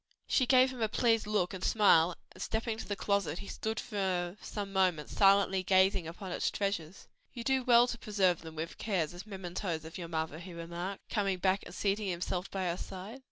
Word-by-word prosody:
She 255 - +2
gave 260 0 +5
him 250 - -8
a 220 - +2
pleased 225 -1 +2
look 205 -3 +1
and 185 -1 -6
smile, 180 -5 +5 0.2
and - - -13
stepping 220 0 -2
to - - -6
the 205 - -2
closet 200 -6 0
he - - -7
stood 220 +2 -3
for 185 -4 -2
some 200 -2 -5
moments 180 -6 +1
silently 195 -1 +5
gazing 190 -2 +3
upon 180 +3 -7
its - - 0
treasures. 195 -4 -3 0.3
"You 235 - -6
do 265 +1 +1
well 240 -1 +6
to 240 -1 -4
preserve 190 -5 +1
them 160 -1 -10
with 160 +1 -5
care 195 -6 +1
as 175 +6 -8
mementoes 180 -4 -4
of 160 +3 -8
your 170 - -5
mother," 160 -1 -3
he 180 +1 -9
remarked, 170 +3 -6
coming 195 -3 +1
back 190 +2 +2
and 175 - -10
seating 205 +1 0
himself 180 +1 -2
by 190 -1 -3
her 175 0 -1
side. 195 +7 -8
190 Hz, 205 wpm, -32 LUFS, 175-210 Hz, 0.3 s, well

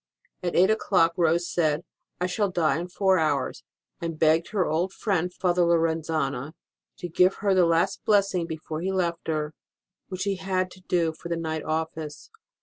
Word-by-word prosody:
At 175 -1 -2
eight 190 +4 +5
o - - +4
clock 175 -6 +2
Rose 170 0 +2
said, 155 -2 0 0.4
I 180 - 0
shall 200 +3 0
die 160 -5 +1
in 175 - -4
four 190 0 +2
hours, 155 -1 -1 0.4
and 165 -2 -3
begged 160 +1 +3
her 195 -4 +1
old 170 +5 0
friend 180 -5 -1
Father 180 0 +1
Lorenzana 160 -5 0 0.4
to 175 - -5
give 180 +3 +3
her 200 -1 +1
the 180 -2 +4
last 170 +4 +1
blessing 195 -5 +2
before 160 -1 -5
he 190 +2 -1
left 175 -3 -1
her, 155 -1 -1 0.5
which 185 -1 -4
he 200 -1 -1
had 185 -1 -1
to 185 - -14
do 170 -3 0
for 170 +2 -9
the 170 - -1
night 160 -1 -3
office. 160 - -4
170 Hz, 180 wpm, -26 LUFS, 160-185 Hz, 0.5 s, eight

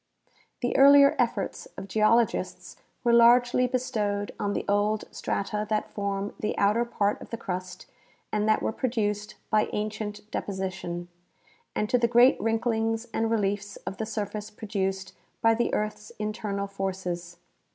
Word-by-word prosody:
The 245 - 0
earlier 280 +1 +8
efforts - - -1
of 195 - -6
geologists 220 +3 +1 0.3
were 240 -1 +3
largely 245 +1 +5
bestowed 215 -5 -1
on 205 0 -1
the - - -2
old 205 +1 +1
strata 210 +1 -2
that 215 -1 -1
form 200 0 -3
tlie 210 - -1
outer 210 +4 +3
part 205 -3 0
of - - -10
the 230 - -4
crust 185 -3 -5 0.5
and 210 0 +1
that 215 - +3
were - - +1
produced 210 -4 -2 0.2
by 215 -1 +3
ancient 210 0 -3
deposition, 185 -3 -4 0.7
and 210 - 0
to 250 - +2
the 235 - +3
great 240 +1 +5
wrinklings 225 0 0
and 225 0 0
reliefs 205 -2 -1
of 195 - -5
the 220 - -3
surface 210 0 -4
produced 195 -3 -3 0.3
by 225 0 +4
the 235 +1 0
earth's 210 0 -3
internal 210 -2 -3
forces. 185 -3 -4
210 Hz, 145 wpm, -27 LUFS, 200-225 Hz, 0.7 s, earlier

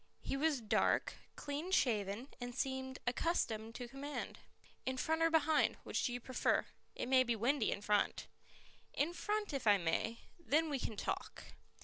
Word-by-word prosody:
He - - -2
was 290 -2 +1
dark, 215 - +2 0.2
clean 290 +5 -4
shaven 225 - +1
and 245 0 -5
seemed 260 0 -2
accustomed 230 -5 0
to 245 - -5
command. 280 +4 -5 0.4
"In 260 0 -2
front 320 +4 0
or 330 - +5
behind? 320 -1 +3
Which - - -1
do - - 0
you 245 - -2
prefer? 255 +2 +1 0.3
It - - -2
may 260 0 +6
be 240 -2 +1
windy 240 +3 +2
in 200 - -2
front." 205 0 +1 0.7
"In 310 +4 +1
front 415 0 -2
if 270 -5 -2
I 205 -1 +7
may; 180 +6 0 0.2
then 320 -1 +2
we 275 - 0
can 220 -3 -4
talk." - - -3
260 Hz, 165 wpm, -36 LUFS, 230-300 Hz, 0.7 s, I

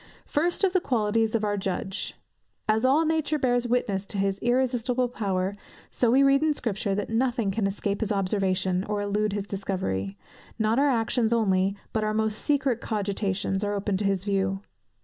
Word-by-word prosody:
First 340 +6 0
of 380 -2 +3
the 370 - +4
qualities 225 -4 +1
of 220 - 0
our 205 -1 0
Judge. 190 0 -3 0.5
As 220 +1 +2
all 290 +5 +4
nature 315 -1 +1
bears 245 -3 +1
witness 205 -5 0
to 205 - -3
his 195 0 0
irresistible 250 0 +1
power, 195 -5 -2 0.4
so 240 - +2
we 265 +4 +5
read 275 0 +4
in 310 -1 +2
Scripture 205 -5 -2
that 205 +2 -3
nothing 235 -3 +1
can 195 0 0
escape 200 0 -2
his 220 -1 -1
observation, 190 -2 0
or 210 0 -2
elude 205 0 0
his 200 -1 -2
discovery; 185 - -3 0.4
not 220 +2 +2
our 285 +1 +4
actions 230 -1 +1
only, 195 -4 +2 0.2
but 220 - 0
our 215 0 0
most 220 -1 0
secret 270 -5 +1
cogitations 200 -2 -1
are 205 0 -1
open 200 0 -1
to 205 - -2
his 195 -2 +1
view. 195 -1 0
215 Hz, 180 wpm, -26 LUFS, 195-245 Hz, 0.5 s, we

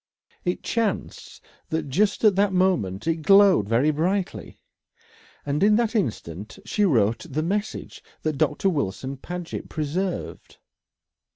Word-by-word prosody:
It 180 - -2
chanced 225 -4 -3 0.2
that 160 -2 -2
just 200 - +1
at 210 -3 +5
that 200 0 +3
moment 170 - +1
it 165 0 +1
glowed 190 - +5
very 125 +7 +3
brightly, 180 +5 -2 0.9
and 145 +2 -1
in 210 +1 +5
that 230 -1 +1
instant 105 - -3
she 210 - +1
wrote 115 - +1
the 155 +3 -1
message 205 +5 -3 0.2
that 155 -3 -2
Doctor 150 +6 +1
Wilson 135 - -2
Paget 175 +4 -6
preserved. 170 +5 -4
165 Hz, 125 wpm, -24 LUFS, 140-195 Hz, 0.9 s, at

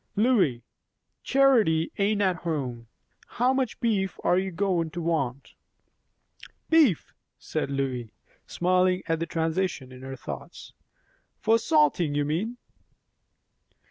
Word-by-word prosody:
"Lois, 200 - +2 0.6
Charity 230 -13 +3
ain't 205 +1 +2
at 185 -2 +1
home 130 -9 -4 0.4
How 250 +2 +1
much 260 -4 -1
beef 205 -6 0
are - - +3
you 190 0 -2
goin' 180 -2 0
to 170 - -6
want?" 140 -6 -2 1.2
"Beef?" 300 - +3 0.2
said - - -3
Lois, 130 -4 -2 0.4
smiling 185 +1 +1
at 165 -1 -1
the 165 - -2
transition 160 -4 -2
in 130 0 -12
her 135 0 -7
thoughts. 125 - -9 0.7
"For 225 +1 +3
salting, 155 -5 +2
you 145 0 +1
mean?" 195 +11 -2
170 Hz, 115 wpm, -26 LUFS, 145-205 Hz, 1.2 s, Charity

